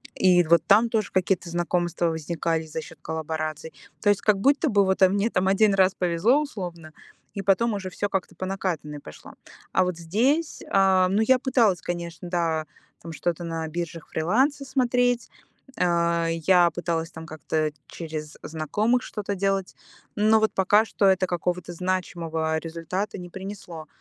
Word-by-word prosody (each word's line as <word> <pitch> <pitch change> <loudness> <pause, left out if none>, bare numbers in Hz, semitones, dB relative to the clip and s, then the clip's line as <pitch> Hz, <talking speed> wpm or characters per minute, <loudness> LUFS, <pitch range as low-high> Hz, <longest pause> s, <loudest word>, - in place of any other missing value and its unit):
И 180 -1 +4
вот 170 +1 +4
там 220 +4 +5
тоже 220 -3 -1
какие-то 185 -1 0
знакомства 175 0 -1
возникали 165 0 -2
за 155 +1 -5
счет - - -13
коллабораций. 160 0 -4 0.3
То 205 - +2
есть 205 -1 +2
как 210 -2 +2
будто 285 +7 +3
бы 200 -4 +3
вот 190 +1 0
мне 200 +4 +1
там 185 -3 0
1 200 +1 +4
раз 190 -1 +4
повезло, 180 - +2
условно, 175 - -7 0.4
и 200 - -2
потом 200 +4 +2
уже 195 -2 -4
всё 205 +2 -3
как-то 190 -2 -3
по 185 - -4
накатанной 180 -6 -3
пошло. 75 - -12 0.4
А 185 - +4
вот 180 -2 -2
здесь, 245 - 0
а, 190 -1 +4
ну, 200 +3 +2
я 255 +3 +4
пыталась, 235 -8 +2
конечно, 175 -1 -5
да, 165 -3 0 0.4
там 165 - -8
что-то 170 +2 -2
на 165 -1 -3
биржах 165 0 -5
фриланса 260 - +1
смотреть, 245 -2 +1 0.5
а, 170 -1 +1
я 170 +1 +3
пыталась 165 -1 -3
там 160 -1 -9
как-то 155 0 -2 0.2
через 155 -2 -7
знакомых 210 - 0
что-то 205 -1 -4
делать, 195 -1 -1 0.4
но 215 +1 +4
вот 220 0 +1
пока 205 +3 +4
что 210 - 0
это 190 -1 +3
какого-то 175 0 -2
значимого 165 -3 -2
результата 170 +6 -4
не 180 -2 -8
принесло. 185 -4 -8
180 Hz, 160 wpm, -25 LUFS, 165-205 Hz, 0.5 s, там